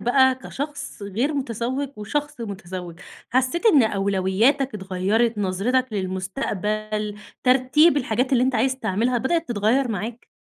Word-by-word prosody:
بقى، 260 +2 +4
كشخص 285 -1 -6
غير 225 +10 -1
متزوج 260 +1 -2
وشخص 295 +7 -3
متزوج، 185 -5 -7 0.3
حسّيت 260 - +1
إن 305 - +7
أولوياتك 200 +6 +1
اتغيرت، 205 +4 0
نظرتك 220 +6 0
للمستقبل، 210 +2 -3 0.3
ترتيب 270 +5 +4
الحاجات 250 -1 0
اللي 250 -2 +4
أنتَ 260 0 0
عايز 260 +3 +1
تعملها، 230 +2 0
بدأت 330 +7 0
تتغيّر 240 +4 +1
معاك؟ 225 +3 -5
235 Hz, 120 wpm, -23 LUFS, 205-265 Hz, 0.3 s, إن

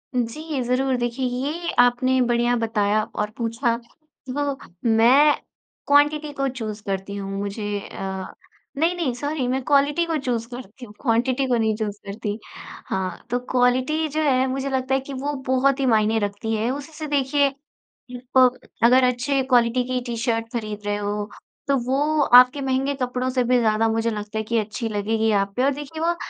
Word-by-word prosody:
जी, 270 +5 -2
ज़रूर। 255 +2 +1
देखिए, 240 +2 -2
ये 285 +8 -2
आपने 245 +1 +4
बढ़िया 240 0 +2
बताया 215 -2 +1
और 210 0 -1
पूछा। 230 +1 0 0.5
तो 280 +1 -2 0.3
मैं 260 +7 +6 0.5
क्वांटिटी 295 +1 +3
को 275 -1 -1
चूज़ 220 -5 -5
करती 195 0 -3
हूँ। 195 -1 -5
मुझे 205 0 -3
अ, 190 -1 -6 0.5
नहीं, 335 +3 +2
नहीं, 320 -8 -1
सॉरी, 285 +1 -2
मैं 260 +2 0
क्वालिटी 285 +4 +2
को 330 -2 -1
चूज़ 240 -4 -2
करती 245 0 -9
हूँ, 205 - -14
क्वांटिटी 255 +2 +1
को 245 -2 +2
नहीं 220 -1 +1
चूज़ 210 -2 -3
करती। 205 +1 -4 0.5
हाँ, 185 +1 -3
तो 245 - 0
क्वालिटी 255 +5 +2
जो 310 +1 -2
है, 260 -3 +3
मुझे 270 +1 -2
लगता 265 0 -1
है - - +2
कि 275 +1 -8
वो 280 +2 -3
बहुत 265 +1 +2
ही 270 - +1
मायने 220 -2 +3
रखती 205 +2 -3
है। 220 +2 0
उसी 285 +3 -6
से, 310 0 -6
देखिए, 285 0 +2 0.9
प 255 -1 +8 0.3
अगर 255 +2 +6
अच्छे 255 +2 +1
क्वालिटी 245 -1 +3
की 255 0 -1
टी-शर्ट 230 -1 -1
खरीद 215 -3 -4
रहे 205 0 0
हो, 205 +1 -3 0.4
तो 280 - +3
वो 290 +4 +1
आपके 250 +3 +7
महँगे 270 +1 0
कपड़ों 250 +1 -1
से 255 -1 +1
भी 250 +1 +3
ज़्यादा, 220 -1 +2
मुझे 225 +1 0
लगता 210 0 -5
है 220 - -1
कि 230 +2 -1
अच्छी 220 +2 -3
लगेगी 220 +1 0
आप 200 -1 +1
पे, 250 - +1
और 275 - +3
देखिए, 295 +3 -8
वो 340 +1 +1
250 Hz, 180 wpm, -23 LUFS, 220-275 Hz, 0.9 s, प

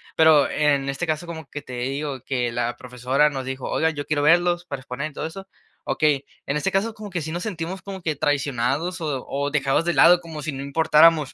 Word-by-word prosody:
pero 160 -3 +5
en 145 -2 +2
este 140 +5 -3
caso, 155 +2 -1
como 160 -3 -7
que 145 +3 -7
te 125 - -10
digo 135 +2 -3
que 125 -3 -1
la 120 +1 -2
profesora 125 +4 +1
nos 135 -2 -4
dijo: 130 0 -5
"Oigan, 160 -1 +1
yo 145 - -4
quiero 145 -1 0
verlos 175 +3 +3
para 140 -6 -5
exponer 140 +5 -5
y - - -22
todo - - -4
eso". 195 +4 -8 0.4
Okey, 145 -3 +1 0.2
en 140 +2 -1
este 190 +6 -1
caso, 215 +4 0
como 210 -1 -9
que 175 -3 -3
sí 160 - -5
nos 175 +1 -3
sentimos 185 -2 -4
como 195 -1 -8
que 155 -2 -1
traicionados 145 +5 -1
o 145 -5 -3
o 140 +1 -2
dejados 140 +1 +1
de 175 0 0
lado 175 0 +7
como 160 -3 -8
si 155 - -2
no 135 -1 -6
importáramos. 155 +1 +4
150 Hz, 230 wpm, -23 LUFS, 135-170 Hz, 0.4 s, lado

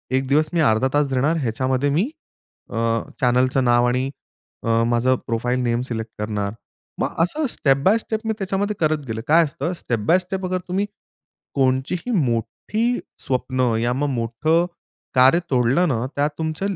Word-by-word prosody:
1 130 0 0
दिवस 150 +3 +2
मी 170 - +1
अर्धा 120 -2 +3
तास 145 0 +3
देणार, 140 +6 +2
ह्याच्यामध्ये 130 +3 0
मी 170 - +1 0.6
अ, - - -7 0.5
चॅनेलचं 130 +1 +3
नाव 120 0 +4
आणि 125 +2 0 0.5
अ, 115 0 +2
माझं 120 +2 +2
प्रोफाइल 120 +2 0
नेम 120 0 +1
सिलेक्ट 110 -1 -4
करणार. 105 -1 -2 0.5
मग - - -1
असं 295 - 0
स्टेप 135 -10 +2
बाय 200 +7 +5
स्टेप 220 -1 -3
मी 220 - +1
त्याच्यामध्ये 200 +2 -1
करत 155 -2 +1
गेलो. 110 -1 -3
काय 165 +3 +6
असतं 150 +4 -3
स्टेप 120 -9 -2
बाय 180 - +5
स्टेप 185 +1 -4
अगर 185 0 -1
तुम्ही 190 +3 0 0.7
कोणची 130 +3 +1
ही 245 - -2
मोठी 205 - 0 0.3
स्वप्न, 130 -2 0
या 120 +1 +1
मग 145 +3 0
मोठं 135 +8 +1 0.5
कार्य 130 +6 +6
तोडलं 130 +7 +3
ना, 120 -5 0
त्यात 145 +1 +2
तुमचं 160 +5 -2
135 Hz, 165 wpm, -22 LUFS, 120-170 Hz, 0.7 s, काय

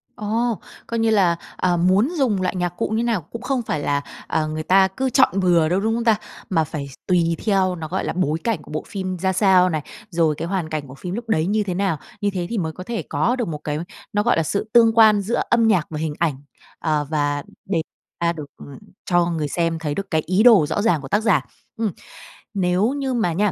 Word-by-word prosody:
Ồ, 225 +2 -1 0.3
coi 230 - -2
như 225 0 +2
là, 190 -6 +4 0.2
ờ, 180 -1 +1
muốn 185 - +3
dùng 230 -9 +1
loại 185 0 -1
nhạc 180 -1 0
cụ - - 0
như 220 +2 0
nào 230 -6 0
cũng 235 +10 -9
không 255 0 -1
phải 160 -9 -2
là, 145 0 0 0.3
ờ, 155 -1 0
người 155 0 -4
ta 190 +3 +5
cứ 260 +8 -2
chọn 255 -6 +3
bừa 175 -4 +3
đâu, 180 +3 +2
đúng 220 +3 0
không 235 - -1
ta? 225 -2 +4 0.3
Mà 165 -4 +2
phải 145 -2 -5
s 135 - -12
tùy 170 -2 +2
theo 190 -3 +2
nó 160 -2 -6
gọi 185 +5 -2
là - - -2
bối 160 -3 0
cảnh 225 -9 -1
của - - -14
bộ 155 - -3
phim 185 -2 -4
ra 190 +2 0
sao 185 -1 +4
này, 155 -3 -1 0.3
rồi 165 -3 +1
cái 165 +3 -4
hoàn 180 -3 -2
cảnh 155 -2 -4
của 130 - -11
phim 175 +6 -6
lúc 235 0 -6
đấy 160 -7 +2
như 210 +3 +1
thế 190 -3 -3
nào. 190 -3 0 0.2
Như 205 - +2
thế 180 -2 -2
thì 235 - -2
mới 160 -5 -1
có 185 - -8
thể 230 +3 -3
có 245 - +1
được 245 -3 -2
một 155 -3 -3
cái, 150 0 -2 0.4
nó 205 0 +2
gọi 240 -3 +2
là 165 - +2
sự 200 +7 -2
tương 230 -1 +6
quan 215 -2 +7
giữa 215 +5 -1
âm 230 -1 +4
nhạc 185 -8 +3
và 155 - -5
hình 155 -1 -2
ảnh, 165 -5 +1 0.4
ờ, 150 -2 0
và 145 -2 0 0.2
để 175 -4 0 0.4
a 170 0 +1
được 155 -3 -7 0.6
cho 175 -1 +3
người 165 -3 -1
xem 165 +2 -1
thấy 150 -2 -3
được 195 0 -5
cái 160 -2 +2
ý 185 +5 +2
đồ 225 -10 +7
rõ 160 +7 -1
ràng 190 -9 +2
của 135 - -8
tác 205 +8 +1
giả. 215 -5 +3 0.4
Ừm, 225 -3 0 0.6
Nếu 185 +2 +2
như 275 -2 -2
mà 220 -8 +1
nha 205 +4 +1
185 Hz, 250 wpm, -22 LUFS, 160-215 Hz, 0.6 s, quan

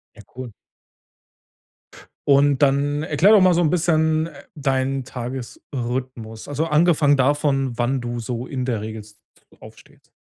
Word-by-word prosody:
Ja 110 - -13
cool. 125 -3 -8 1.8
Und 140 0 +4
dann 145 +2 +2
erkläre 160 +8 +4
doch 205 - +7
mal 185 -1 +5
so 175 - +2
'n 155 - +2
bisschen, 160 -2 +1
äh, 145 -4 -12
deinen 135 -2 -1
Tagesrhythmus. 125 -2 -6
Also, 150 +3 -1
angefangen 150 -2 +3
davon, 135 -2 0
wann 125 +2 0
du 120 0 -4
so 120 +2 -5
in 130 -2 -4
der 120 -4 -2
Regel 110 0 -6
jetzt 105 -1 -19 0.4
aufstehst. - - -17
135 Hz, 140 wpm, -21 LUFS, 125-150 Hz, 1.8 s, doch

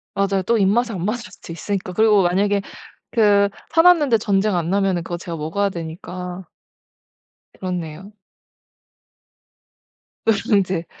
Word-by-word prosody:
맞아요. 195 -1 +1
또 235 +3 +2
입맛에 225 +4 +2
안 180 -2 -3
맞을 215 -1 -3
수도 170 - -10
있으니까. 185 +2 -4
그리고 210 0 +4
만약에 200 +3 +1 0.5
그 205 -3 +4 0.2
사 325 - +4
놨는데 305 -9 +5
전쟁 205 -1 +1
안 170 -1 -1
나면은 195 -3 +1
그거 175 +1 -5
제가 170 -1 -6
먹어야 165 +6 -1
되니까. 180 +2 -7 1.0
그렇네요. 180 +1 -6 2.1
누룽지. 200 -5 +1
195 Hz, 275 characters per minute, -21 LUFS, 180-210 Hz, 2.1 s, 놨는데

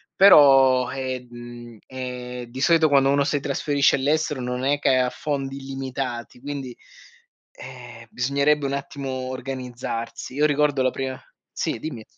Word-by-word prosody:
però 135 -9 +7
eh, 130 -2 -4
mhmm, 120 -1 -11
è 125 -1 -6
di 130 +3 -8
solito 160 +2 +4
quando 135 -1 +4
uno 140 0 +3
si 145 0 0
trasferisce 140 0 +1
all'estero 145 0 0
non 125 +1 -3
è 145 +1 +1
che 130 - +3
ha 125 -1 +2
fondi 140 -3 -4
illimitati 130 -3 -5
quindi, 135 -3 -6 0.8
eh, 120 -3 -11
bisognerebbe 140 +3 +1
un 135 - -2
attimo 140 -1 -5 0.2
organizzarsi. 125 -2 -6
Io 150 +2 +3
ricordo 145 -2 +2
la 130 - +2
prima 130 0 -5 0.3
sì - - -2
dimmi. 120 -7 -7
135 Hz, 145 wpm, -23 LUFS, 125-140 Hz, 0.8 s, però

